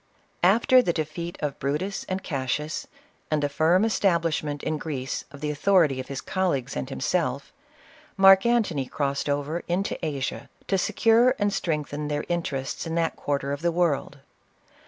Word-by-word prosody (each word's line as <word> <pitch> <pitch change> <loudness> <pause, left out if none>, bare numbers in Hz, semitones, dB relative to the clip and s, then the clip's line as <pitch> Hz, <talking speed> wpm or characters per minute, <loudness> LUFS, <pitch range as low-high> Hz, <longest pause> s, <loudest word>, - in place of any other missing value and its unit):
After 230 +7 +5
the 175 -8 0
defeat 165 +2 -4
of 145 -2 -3
Brutus 150 +9 -2
and 185 +1 -3
Cassius, 150 0 -3 0.4
and 150 -1 0
the - - +3
firm 165 +7 +3
establishment 165 -8 0
in 155 -1 -1
Greece 135 -5 -4
of 140 0 -13
the 150 0 -1
authority 150 -3 +3
of 130 - -5
his 135 -1 -5
col 190 -1 0
leagues 135 0 -4
and 130 - -3
himself, 140 -2 -1 0.6
Marc 195 0 +7
Antony 210 - +1
crossed 140 +1 -2
over 145 +3 -1
into 180 +1 -2
Asia, 140 -4 -3 0.2
to 195 - +1
secure 230 +5 +3
and 205 -2 0
strengthen 150 -2 -2
their 150 0 -2
interests 155 -4 -2
in 165 - -3
that 165 -1 0
quarter 140 -1 -2
of 145 - -5
the 170 0 +1
world. 165 -4 0
155 Hz, 160 wpm, -25 LUFS, 140-185 Hz, 0.6 s, Marc